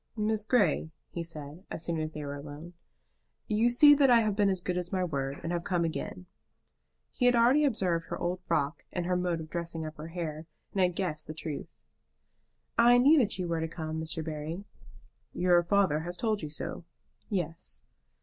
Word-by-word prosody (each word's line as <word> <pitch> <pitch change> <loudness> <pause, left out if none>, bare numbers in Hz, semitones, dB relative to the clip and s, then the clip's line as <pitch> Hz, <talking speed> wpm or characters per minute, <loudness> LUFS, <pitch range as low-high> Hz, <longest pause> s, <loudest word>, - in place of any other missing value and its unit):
"Miss 215 0 0
Grey," 205 -9 +2 0.2
he 170 - -4
said, 155 +1 -7
as 160 - -5
soon 165 -2 -1
as 155 0 -3
they 150 -2 -6
were 140 - -4
alone, 145 +4 -9 0.7
"you 220 +3 +2
see 290 +5 +8
that 280 -2 +5
I 235 -2 +7
have 215 -2 0
been 205 -1 +3
as 190 -1 0
good 180 0 -2
as 180 -1 -3
my 185 -2 0
word, 140 -4 -2
and 165 - -2
have 170 -1 -1
come 175 -2 +1
again." 175 +3 -4 0.9
He 245 - +2
had 245 - +5
already 245 +6 +5
observed 185 -10 0
her - - -4
old 180 +1 -2
frock 155 -2 0
and 175 -2 -2
her 180 +1 +1
mode 180 -2 0
of 155 - -10
dressing 170 -2 -4
up 155 0 -7
her 155 +1 -7
hair, 165 -2 -5 0.3
and 195 - +1
had 180 -1 +2
guessed 155 -5 -3
the 155 - -6
truth. 155 -2 -6 1.0
"I 240 +1 +7
knew 285 +5 +6
that 215 -7 +1
you 180 -2 -2
were 165 -1 -1
to 160 - -1
come, 160 -1 -4
Mr. 160 0 -3
Barry." 160 +4 -4 0.7
"Your 175 -1 +4
father 185 -3 +2
has 175 +2 -5
told 220 -3 0
you 155 - -5
so." 150 - -5 0.5
"Yes." 165 - -3
175 Hz, 200 wpm, -30 LUFS, 160-200 Hz, 1.0 s, see